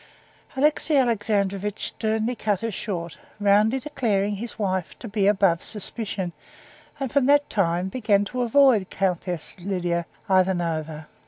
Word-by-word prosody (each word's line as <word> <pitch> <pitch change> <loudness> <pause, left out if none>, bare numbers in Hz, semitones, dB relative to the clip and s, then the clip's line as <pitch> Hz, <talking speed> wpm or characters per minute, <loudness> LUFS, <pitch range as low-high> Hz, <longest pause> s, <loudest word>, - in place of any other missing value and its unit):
Alexey 300 +1 +3
Alexandrovitch 205 -4 0
sternly 220 +2 -1
cut 205 -4 -1
her 230 0 -2
short, 175 -5 -5 0.2
roundly 210 +4 +3
declaring 210 -8 -1
his 230 +2 -6
wife 190 -5 -2
to 240 - -8
be 205 -2 +1
above 195 -4 +3
suspicion, 205 -3 -3 0.7
and 270 -4 -3
from 275 -2 +2
that 290 0 +4
time 180 -2 +1
began 205 -2 +1
to 250 +4 -3
avoid 245 -5 +4
Countess 180 -3 -1
Lidia 175 -2 -2 0.2
Ivanovna. 170 -5 0
205 Hz, 130 wpm, -24 LUFS, 185-230 Hz, 0.7 s, that